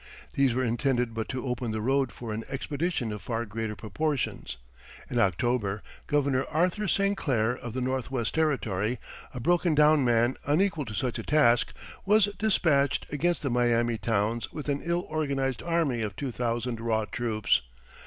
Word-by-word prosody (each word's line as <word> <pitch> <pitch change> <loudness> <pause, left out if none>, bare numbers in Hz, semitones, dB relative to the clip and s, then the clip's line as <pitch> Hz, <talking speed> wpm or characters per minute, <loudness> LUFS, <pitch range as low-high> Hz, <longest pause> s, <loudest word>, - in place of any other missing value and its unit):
These 135 -4 +2
were 130 - +1
intended 120 0 0
but 110 -1 -4
to 130 +1 -3
open 125 -2 -2
the 110 0 -2
road 135 +2 +1
for 110 +1 -6
an 110 +1 -4
expedition 145 -2 -2
of 105 -1 -5
far 115 -1 -2
greater 110 0 -4
proportions. 130 - -2 0.5
In 120 - +1
October, 105 -1 +1 0.2
Governor 140 -3 +2
Arthur 180 +6 +1
St. 200 +1 +2
Clair, 120 - +1
of 120 -3 -7
the 130 - -2
Northwest 130 -2 -1
Territory, 125 -8 0 0.3
a 125 - -6
broken 175 +3 +2
down 150 -1 +5
man 120 +1 +2
unequal 160 0 +1
to 110 -2 -6
such 125 +1 -1
a - - -4
task, 120 -6 +3 0.3
was 205 +1 +4
despatched 145 -11 +2
against 170 +4 0
the 140 - 0
Miami 120 -1 +2
towns 110 +2 0
with 150 -1 -6
an 140 0 0
ill 170 +1 0
organized 140 -6 -1
army 165 -8 0
of 105 -2 -3
two 140 -3 -3
thousand 120 0 -2
raw 110 -2 0
troops. 110 -2 +1
125 Hz, 165 wpm, -28 LUFS, 115-150 Hz, 0.5 s, down